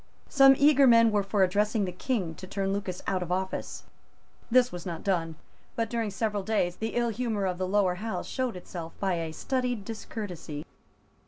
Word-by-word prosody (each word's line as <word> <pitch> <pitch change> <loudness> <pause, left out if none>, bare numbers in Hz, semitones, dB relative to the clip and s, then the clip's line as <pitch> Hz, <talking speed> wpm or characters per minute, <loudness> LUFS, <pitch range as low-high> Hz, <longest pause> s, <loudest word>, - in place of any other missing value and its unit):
Some 270 -1 +7
eager 280 -1 +6
men 230 -2 +6
were 205 -1 +2
for 195 0 +1
addressing 205 +3 +1
the 180 - -3
King 185 -3 -2
to 185 +4 -10
turn 195 0 -1
Lucas 195 -3 -4
out 190 -2 0
of 180 -1 -4
office. 190 +1 -3 0.7
This 250 +1 +4
was 175 -1 -6
not 170 -3 -5
done; 165 -5 0 0.4
but 230 -1 -1
during 230 -2 -1
several 205 +1 -1
days 190 -4 0
the 220 0 -3
ill 240 -1 +2
humour 220 -3 -1
of 180 -1 -2
the 185 - -1
Lower 195 -1 +2
House 225 0 -3
showed 255 -4 -2
itself 170 -2 -7
by 195 -2 +1
a 165 -1 -3
studied 250 +2 -2
discourtesy. 180 -9 -6
205 Hz, 185 wpm, -28 LUFS, 180-230 Hz, 0.7 s, Some